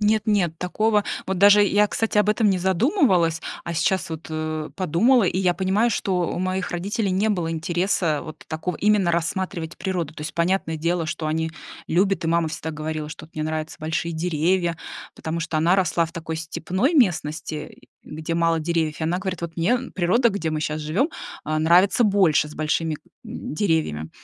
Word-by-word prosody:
Нет-нет, 210 -5 +2
такого 210 +4 +1 0.2
вот 190 -1 -2
даже 205 +2 +7
я, 205 +1 +3
кстати, 225 0 0
об 210 - +3
этом 215 0 +3
не 190 -2 +2
задумывалась, 185 - +2 0.2
а 170 - -4
сейчас 185 +3 +1
вот, 160 0 -6
э, 155 0 -3
подумала, 195 - +3
и 185 0 0
я 180 -2 +2
понимаю, 195 +6 +1
что 190 -4 0
у - - -3
моих 185 0 -2
родителей 195 +4 -1
не 195 +4 +1
было 175 -5 -1
интереса 170 -1 0
вот 155 -2 -10
такого 160 +2 -3
именно 205 -2 +3
рассматривать 170 0 -2
природу. 175 -4 -3
То - - -10
есть, 155 +1 -5
понятное 170 -1 0
дело, 170 +2 0
что 155 0 -3
они 160 +1 -1 0.4
любят, 190 +2 +2
и - - 0
мама 170 0 +2
всегда 160 +1 -4
говорила, 155 0 -4
что 155 0 -9
вот: 165 - -31
"Мне 155 - -3
нравятся 155 0 -3
большие 160 +2 -2
деревья", 170 +1 0 0.4
потому 160 +1 -4
что 165 -1 -2
она 165 +4 +3
росла 180 -3 +2
в 165 - -14
такой 160 -1 -5
степной 180 - -1
местности, 160 - 0 0.3
где 155 +2 -5
мало 165 -1 +2
деревьев. 160 -1 -1
И - - -3
она 170 +3 0
говорит: 185 -2 -4
"Вот 170 -1 -6
мне, 170 +5 +1
м, 250 +1 -1
природа, 205 +7 +2
где 190 -7 -2
мы 155 -1 -2
щас 155 0 -2
живём, 170 - 0 0.3
а, 155 0 -1
нравится 180 +8 +4
больше, 190 -8 +3
с 150 - -11
большими, 155 0 -1 0.3
м, - - -6
деревьями". 155 - 0
170 Hz, 190 wpm, -23 LUFS, 160-195 Hz, 0.4 s, даже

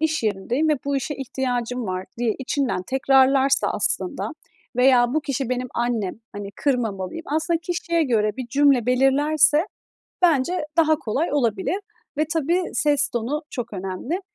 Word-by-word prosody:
iş 315 -4 0
yerindeyim 225 +9 0
ve 305 - +4
bu 280 -1 0
işe 285 +3 -3
ihtiyacım 250 -3 -3
var" 185 0 -3
diye 235 -3 +1
içinden 265 -7 -1
tekrarlarsa 265 +3 +3
aslında 325 -6 -1 0.5
veya, 250 -1 +4
"Bu 310 - +2
kişi 270 -3 -3
benim 255 0 -2
annem, 235 -5 -1 0.2
hani, 205 -1 -6
kırmamalıyım" 240 - -2
aslında 320 +3 0
kişiye 340 -1 0
göre 220 -7 +2
bir 255 -2 -5
cümle 275 -4 +3
belirlerse 290 +5 +3 0.6
bence 320 0 +2
daha 315 -2 +4
kolay 280 +8 -2
olabilir 240 - 0 0.4
ve 305 - +2
tabii 335 +3 +1
ses 290 -1 +2
tonu 250 +6 -2
çok 240 -3 -5
önemli. 195 - -4
265 Hz, 140 wpm, -23 LUFS, 240-305 Hz, 0.6 s, ve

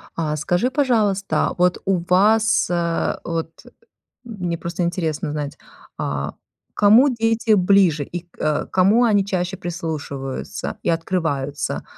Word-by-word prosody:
А 155 -2 -1
скажи, 175 - 0
пожалуйста, 220 -8 +1
вот 180 0 +2
у 190 -1 +2
вас, 215 +4 +4
э, 170 -1 0
вот 165 -1 -3 0.7
мне 180 -8 -4
просто 170 +1 -3
интересно 165 -3 -2
знать, 150 -1 -4 0.4
а, 70 0 -3 0.4
к - - -11
кому 220 +7 +6
дети 225 -2 +1
ближе 185 -6 +4
и 175 +4 -6
к - - -28
а, 150 -1 0
кому 200 +6 +3
они 205 -4 +3
чаще 185 -1 -2
прислушиваются 155 -6 -5
и - - 0
открываются? 165 -5 -2
175 Hz, 130 wpm, -21 LUFS, 160-205 Hz, 0.7 s, кому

